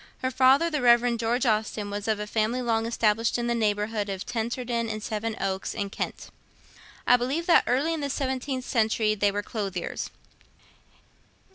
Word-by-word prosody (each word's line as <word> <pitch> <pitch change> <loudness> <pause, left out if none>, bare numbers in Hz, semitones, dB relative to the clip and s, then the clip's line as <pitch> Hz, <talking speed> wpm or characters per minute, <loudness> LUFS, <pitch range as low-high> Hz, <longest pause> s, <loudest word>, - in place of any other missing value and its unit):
Her 260 - 0
father, 270 +7 +4
the 300 -3 -1
Rev. 240 0 +5
George 235 +4 0
Austen, 215 -2 0
was 205 +1 -4
of 215 -1 +1
a 210 - -3
family 220 +4 0
long 225 -1 0
established 225 0 +1
in 240 - -2
the 240 - +1
neighbourhood 210 -1 0
of 195 -1 -4
Tenterden 235 0 -2
and 215 -1 -4
Sevenoaks 210 -4 -3
in 200 -1 -3
Kent. - - -5 0.7
I 245 - +6
believe 270 +7 -2
that 345 - +5
early 280 +7 +1
in 320 - -3
the 285 - -2
seventeenth 260 -1 -2
century 220 -2 +1
they 205 -1 +1
were 205 +1 -3
clothiers. 195 -6 -4
230 Hz, 165 wpm, -26 LUFS, 210-250 Hz, 0.7 s, I